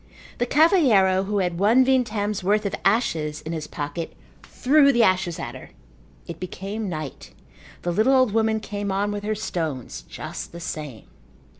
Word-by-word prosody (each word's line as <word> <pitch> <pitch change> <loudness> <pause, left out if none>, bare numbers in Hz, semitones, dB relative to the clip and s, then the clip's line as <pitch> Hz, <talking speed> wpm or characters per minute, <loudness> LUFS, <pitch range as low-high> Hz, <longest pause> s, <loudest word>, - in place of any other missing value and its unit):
The 245 - +1
cavalheiro 240 - +4
who 205 0 -1
had 180 -3 -1
one 230 +6 +5
vintem's 215 -6 0
worth 210 +3 +2
of 200 - -2
ashes 160 -8 +1
in 160 - -6
his 155 -2 -4
pocket 145 +3 -5 0.3
threw 280 +1 +3
the 240 -3 +3
ashes 185 -4 +1
at - - -5
her. - - -11 0.6
It - - -8
became 195 +3 -5
night. 155 -5 -6 0.5
The 175 - -1
little 220 +9 +3
old 255 -4 +4
woman 220 0 +2
came 205 -1 -4
on 200 +2 0
with 205 0 -4
her 215 +1 -1
stones 160 - -4
just - - -7
the 170 - -8
same. 150 -8 -6
200 Hz, 165 wpm, -24 LUFS, 170-225 Hz, 0.6 s, one